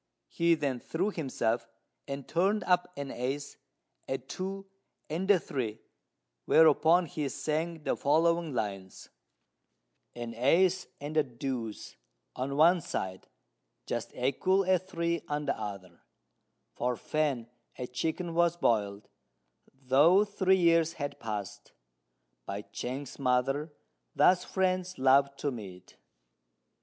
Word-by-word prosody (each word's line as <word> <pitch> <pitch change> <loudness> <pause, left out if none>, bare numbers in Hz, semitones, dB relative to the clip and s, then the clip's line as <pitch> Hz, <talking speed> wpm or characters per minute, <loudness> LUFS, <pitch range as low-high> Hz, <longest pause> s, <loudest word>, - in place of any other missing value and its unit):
He 170 0 +3
then 140 -5 -2
threw 180 - -2
himself, 120 - -1 0.4
and 140 -1 -5
turned 195 +4 +1
up 180 0 +2
an 140 -1 -4
ace, 135 +4 -4 0.5
a 135 - -1
two, 190 +9 -6 0.5
and 180 +5 -2
a 200 -3 +6
three; 120 -9 -3 0.7
whereupon 160 +2 +5
he 150 -2 -3
sang 160 +2 -2
the - - 0
following 165 +2 +2
lines: 100 -6 -4 1.1
"An 120 -1 -5
ace 180 +9 +3
and 150 +2 -5
a 155 - +5
deuce 120 -3 -5 0.4
on 135 +2 -3
one 170 +3 +6
side, 95 -9 -4 0.6
just - - -3
equal 185 +10 +2
a 185 -1 +3
three 170 -3 -2
on 150 0 -2
the - - 0
other: 100 -5 -7 0.7
For 125 0 -1
Fan 145 -7 -1 0.3
a 125 - -3
chicken 160 +7 -3
was 170 0 +2
boiled, 105 -8 0 0.6
though 140 +9 +4
three 190 -2 +2
years 165 -2 +3
had 145 -3 -5
passed, 105 -4 -6 0.7
by 100 +1 -4
Chang's 130 +6 -6
mother. 135 +4 +1 0.4
Thus 180 0 +5
friends 185 -1 -1
love 135 +1 +4
to 145 - -1
meet!" 95 -7 -10
145 Hz, 120 wpm, -30 LUFS, 125-170 Hz, 1.1 s, a